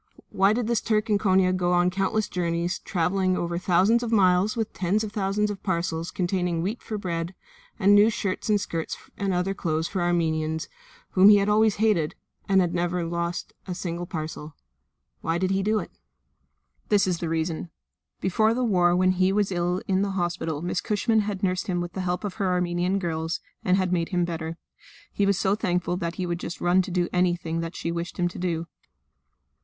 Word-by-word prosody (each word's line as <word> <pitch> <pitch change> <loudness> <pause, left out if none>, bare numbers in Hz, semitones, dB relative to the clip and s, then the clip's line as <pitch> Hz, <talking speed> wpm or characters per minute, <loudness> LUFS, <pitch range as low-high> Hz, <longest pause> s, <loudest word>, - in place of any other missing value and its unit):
Why 195 +1 +4
did 235 +2 0
this 235 0 +1
Turk 215 0 0
in 205 - +3
Konia 185 -2 +3
go 180 -1 +1
on 175 0 +3
countless 195 +3 0
journeys, 175 0 -1
travelling 185 +1 0
over 170 0 -2
thousands 185 +6 +3
of 235 -2 -3
miles 195 +1 +3
with 225 -2 -2
tens 195 +4 0
of 215 - -4
thousands 205 +1 0
of 200 - -7
parcels 170 -2 -2
containing 175 -2 -1
wheat 210 +6 -3
for 215 - -5
bread 170 -2 -3 0.4
and 200 -1 +5
new 205 +2 +7
shirts 200 -2 -3
and 210 -1 +4
skirts 165 -5 -4 0.2
and 200 -1 -1
other 180 +2 0
clothes 160 -4 -1
for 190 - -3
the 175 - +1
Armenians 160 -2 0 0.4
whom 190 +2 +7
he 210 - +8
had 200 0 +1
always 215 0 +4
hated, 205 -8 +1 0.3
and 185 -3 +3
never 175 0 -1
lose 170 +1 -2 0.2
a 180 - -3
single 175 -1 -4
parcel? 155 -2 -6 0.7
Why 165 +1 0
did 185 +1 0
he 195 0 +1
do 215 +2 +1
it? - - -4 1.0
This 205 -2 +4
is 180 -3 -1
the 170 - -3
reason. 165 +1 -2 0.5
Before 215 +5 +2
the 255 - 0
war 180 -6 +3
when 185 +1 +3
he 185 +1 +2
was 200 0 +1
ill 180 +1 -1
in 190 0 +2
the 200 - 0
hospital 170 -3 -2
Miss 180 +1 -1
Cushman 220 +2 +1
had 205 -2 -2
nursed 185 -1 0
him 180 -2 0
with 175 0 -4
the 190 - -3
help 180 +1 -2
of 205 -3 -3
her 190 -2 +2
Armenian 180 +1 0
girls, 165 -2 -2 0.2
and 185 0 +3
had 185 -1 0
made 170 -2 0
him 175 -2 +1
better; 165 -1 -4 0.6
he 200 - +1
was 200 -2 +2
so 195 0 +2
thankful 180 -3 0
that 170 -1 -3
he 185 - -2
would 175 -1 -2
just 175 - -6
run 175 +2 +3
to 185 - -5
do 175 -1 0
anything 175 -2 0
that 165 +1 -4
she 170 - -3
wished 170 +1 -4
him 175 - +1
to - - -9
do. 170 -2 -1
180 Hz, 205 wpm, -25 LUFS, 170-200 Hz, 1.0 s, he